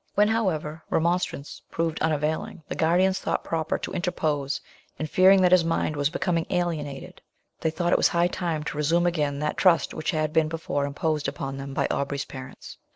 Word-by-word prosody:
When, 210 +1 +4
however, 165 -8 -1
remonstrance 170 -3 -1
proved 165 -1 -2
unavailing, 155 +2 -1
the - - -4
guardians 185 +4 +2
thought - - -1
proper 160 -1 -1
to - - -6
interpose, 155 -6 -1 0.4
and, 155 - -3
fearing 185 +3 +6
that 180 - +4
his 185 -2 +6
mind 165 -2 0
was 145 0 +1
becoming 170 0 -1
alienated, 160 -6 -3 0.4
they 160 - +1
thought 170 +2 0
it - - +5
high 170 0 +2
time 170 -3 -2
to 150 - -5
resume 165 +4 +2
again 150 -5 0
that 150 0 -1
trust 175 -4 +3
which - - -3
had 155 -2 0
been 160 -2 +3
before 155 -3 -2
imposed 150 0 -1
upon 135 0 -4
them 135 0 -6
by - - +1
Aubrey's 140 0 -2
parents. 130 -1 -10
160 Hz, 180 wpm, -26 LUFS, 150-175 Hz, 0.4 s, fearing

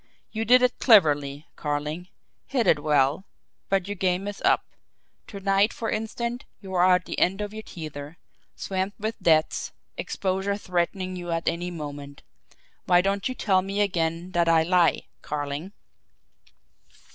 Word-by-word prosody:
You 220 0 -2
did 250 +3 +6
it 250 - +2
cleverly, 145 - +4
Carling; 150 +3 -3 0.4
hid 255 -4 0
it 150 - +4
well 145 +2 +2 0.5
but 195 -1 +1
your 205 - -2
game 190 0 0
is 205 -1 -6
up. - - +3 0.6
To 200 - -8
night, 195 +2 +3
for 225 - -4
instance, 235 +3 -3 0.2
you 190 -2 -9
are 180 0 +5
at 180 - -2
the - - -4
end 190 +3 +2
of 210 0 -4
your 220 - -6
tether, 155 -4 -8 0.4
swamped 190 +2 -3
with 220 +2 -3
debts, 160 -1 +2 0.2
exposure 190 +1 -1
threatening 185 0 -2
you 175 -1 -6
at 165 0 -2
any 175 +1 -1
moment. 145 -4 -8 0.6
Why 175 -1 +5
don't 195 +4 0
you 255 - -4
tell 190 -6 +2
me 195 +2 -3
again 170 -2 -1
that 170 -1 +2
I 165 -1 +5
lie 175 -1 +3 0.2
Carling?" 145 +4 -4
180 Hz, 155 wpm, -26 LUFS, 160-200 Hz, 0.6 s, did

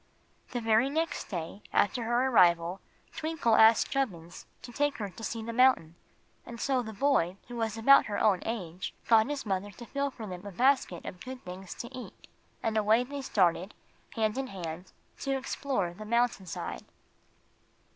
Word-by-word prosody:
The 245 - -3
very 225 +3 +3
next 320 +2 -1
day 175 +1 -5
after 225 +4 +1
her 240 +2 +2
arrival 175 -6 +4 0.3
Twinkle 310 -7 0
asked 220 0 +6
Chubbins 180 -12 -3 0.2
to 245 - -9
take 290 +3 0
her 205 -3 -4
to 190 +5 -12
see 225 0 -3
the 230 +1 -5
mountain; 250 -10 +4 0.5
and 235 -1 -9
so 265 0 +1
the 220 -2 -6
boy, 200 -6 +1
who 240 - -6
was 225 -2 -2
about 275 +5 +6
her 205 - -2
own 195 -4 +3
age, 185 -6 -5
got 225 +2 +5
his 290 -3 -3
mother 195 0 -2
to 235 +4 -11
fill 280 +3 -2
for 235 -4 -9
them 180 -3 -7
a 200 - -7
basket 250 -4 +1
of 180 - -8
good 255 0 -8
things 180 +1 -8
to 235 - -8
eat, 255 - -10 0.4
and 220 -1 0
away 215 +3 +4
they 280 +2 -6
started, 185 -5 +1 0.4
hand 220 +2 0
in 270 - -2
hand, 180 -3 -7 0.3
to 275 -1 -1
explore 260 -8 -2
the 210 +4 -9
mountain 235 -3 0
side. - - -5
225 Hz, 175 wpm, -30 LUFS, 190-255 Hz, 0.5 s, asked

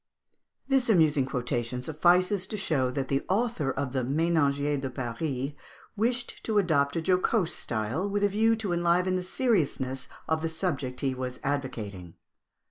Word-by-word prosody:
This 270 -3 +2
amusing 155 -9 +4
quotation 125 -1 -2
suffices 180 +6 +3
to 210 - -4
show 140 -9 +1
that 135 +1 -2
the 135 +1 0
author 205 - 0
of 135 -1 -2
the 130 - +1
"Ménagier 145 0 +1
de 135 - -3
Paris" 130 +2 -3 0.4
wished 240 +3 -1
to 220 -2 0
adopt 150 -7 +2
a 165 - -1
jocose 185 +1 +2
style, 120 - -2
with 205 0 0
a 205 - +4
view 220 +3 +3
to 210 -5 -2
enliven 175 +2 +2
the 185 - 0
seriousness 155 - 0 0.2
of 160 0 +1
the 165 - -1
subject 145 -7 -2
he 135 -2 0
was 130 0 -5
advocating. 110 -11 -4
155 Hz, 155 wpm, -28 LUFS, 130-185 Hz, 0.4 s, amusing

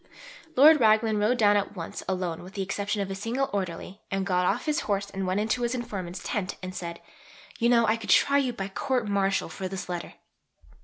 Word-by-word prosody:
Lord 300 +4 +8
Raglan 220 -1 +4
rode 220 +4 +2
down 205 -3 +5
at 200 0 -2
once 165 -3 -6
alone 180 -3 -2
with 185 +3 -12
the 195 - -1
exception 200 +2 -2
of 195 - -6
a - - -2
single 230 +7 -2
Orderly, 190 +1 -4
and 195 0 -1
got 180 -2 +1
off - - 0
his 305 -2 +1
horse 200 -1 -2
and 190 -1 -3
went 185 +2 0
into 220 +3 0
his 240 +1 0
informant's 190 -7 -5
tent 185 -3 -3
and 185 0 -5
said, 170 -2 -6 0.6
"You 235 0 +3
know 235 -1 +5
I 220 +1 +2
could 225 - -9
try 280 0 +5
you 260 -3 0
by 195 -5 -5
Court 250 +3 -1
Martial 195 -1 +1
for 190 - -5
this 190 0 -6
letter." 175 -1 -5
200 Hz, 215 wpm, -27 LUFS, 185-230 Hz, 0.6 s, Lord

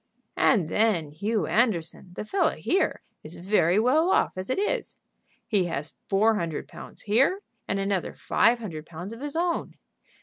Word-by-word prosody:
"And 200 -11 +4
then 175 -5 +1
Hugh 205 +4 -1
Anderson, 180 -4 0
the 210 - -6
fellow 390 - +1
here, 385 - 0 0.2
is 155 +3 -7
very 185 0 +2
well 295 +10 +3
off - - +2
as 185 0 -5
it 260 - 0
is. 420 +5 -1 0.5
He 200 -4 +2
has 155 -3 -4 0.2
four 215 +3 +4
hundred 165 -5 -3
pounds - - -10
here, 265 - +2 0.3
and 195 - 0
another 195 -2 -1
five 240 +1 +3
hundred 165 -9 -7
pounds 175 +6 -7
of 230 - -10
his 290 +1 -5
own. 340 0 -1
205 Hz, 165 wpm, -26 LUFS, 175-245 Hz, 0.5 s, And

